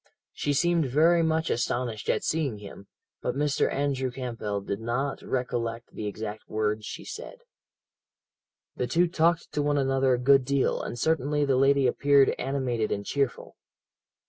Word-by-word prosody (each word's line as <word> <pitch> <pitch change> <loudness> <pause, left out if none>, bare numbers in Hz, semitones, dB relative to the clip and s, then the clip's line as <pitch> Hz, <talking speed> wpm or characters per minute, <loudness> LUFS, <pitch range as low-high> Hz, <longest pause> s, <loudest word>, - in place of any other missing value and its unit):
"She 145 - -1
seemed 170 +1 +2
very 165 +6 +4
much 160 0 +1
astonished 120 -2 -2
at - - +1
seeing 150 -8 -1
him, 100 -1 -11 0.3
but 125 - -2
Mr. 145 0 +1
Andrew 135 -2 -1
Campbell 115 -5 -4
did 100 +1 -4
not 120 +5 -2
recollect 120 -2 -3
the 105 - -4
exact 105 +1 -6
words 105 0 -1
she - - -7
said. - - -8 1.3
"The - - -2
two 175 +1 +3
talked 170 0 +1
to 150 - -1
one 145 0 +1
another 135 -1 +2
a - - -2
good 135 +2 +4
deal, 140 +1 +1
and - - -5
certainly 150 +1 +1
the 135 -2 +2
lady 135 +1 +4
appeared 140 +2 +4
animated 125 -4 -1
and 100 0 -2
cheerful. 140 -3 -2
135 Hz, 155 wpm, -27 LUFS, 120-145 Hz, 1.3 s, very